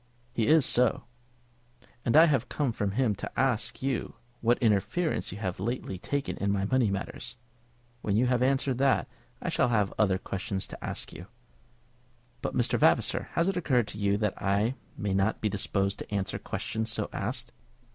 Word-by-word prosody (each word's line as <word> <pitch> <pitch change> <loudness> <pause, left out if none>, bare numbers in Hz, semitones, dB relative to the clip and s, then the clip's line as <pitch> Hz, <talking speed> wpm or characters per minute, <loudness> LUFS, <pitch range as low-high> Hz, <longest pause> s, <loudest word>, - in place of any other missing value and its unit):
"He 115 -3 +1
is 155 -2 +5
so." 125 -1 +3 1.0
"And 115 - +3
I 160 - +10
have 140 -7 +1
come 145 -5 0
from 100 -3 -2
him 120 -2 +2
to 100 - -6
ask 130 -2 0
you 135 -2 -1 0.2
what 120 +1 +3
interference 120 - +1
you 95 - -6
have 95 -4 -3
lately 100 -3 -3
taken 145 - -2
in 100 0 0
my 100 -1 0
money 125 0 +2
matters. 100 +3 -5 0.7
When 100 - 0
you 125 - +4
have 125 -1 +2
answered 130 -1 +1
that, 135 0 +3 0.4
I - - -1
shall 125 - +2
have 105 -5 +1
other 95 -4 +3
questions 95 0 -3
to - - -10
ask - - -5
you." 90 - -9 1.1
"But, - - -3
Mr. 120 - +1
Vavasor, - - +2
has 170 - +2
it 195 -2 0
occurred 130 -10 +2
to 105 - -7
you 100 0 +2
that 105 -2 -2
I 100 +5 +2 0.2
may 100 -2 -1
not 95 +3 +1
be 110 - 0
disposed 100 0 -1
to - - -8
answer 100 -2 -1
questions 110 0 -3
so 110 -2 -2
asked?" 120 +4 -3
110 Hz, 180 wpm, -29 LUFS, 100-130 Hz, 1.1 s, I